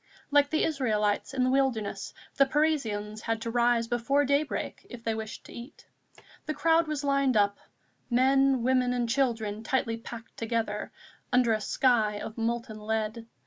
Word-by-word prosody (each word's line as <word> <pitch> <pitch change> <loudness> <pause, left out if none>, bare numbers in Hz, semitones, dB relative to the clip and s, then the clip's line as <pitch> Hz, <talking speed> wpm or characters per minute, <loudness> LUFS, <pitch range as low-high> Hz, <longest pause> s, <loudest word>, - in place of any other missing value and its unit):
Like 285 0 +4
the 315 - +1
Israelites 215 -10 0
in 265 -2 0
the 255 - +2
wilderness, 260 -6 0 0.2
the 275 - +4
Parisians 225 -8 0
had 225 -1 -1
to 230 - -3
rise 240 0 +2
before 245 +5 +1
daybreak 280 +2 -1
if 240 -2 -10
they 225 - 0
wished 220 0 -6
to - - -13
eat. 240 +5 -11 0.6
The 310 - -2
crowd 325 +2 +3
was 300 -2 -3
lined 275 -3 +2
up, 200 -1 +2 0.5
men, 265 +1 +3
women 255 0 +2
and 240 -1 0
children 230 -5 0
tightly 230 -1 -1
packed 230 0 -10
together, 225 -2 -2 0.4
under 250 -3 +4
a 215 - -1
sky 215 -3 +2
of 220 - -7
molten 230 -1 -3
lead. 220 +1 -3
240 Hz, 160 wpm, -28 LUFS, 220-275 Hz, 0.6 s, Like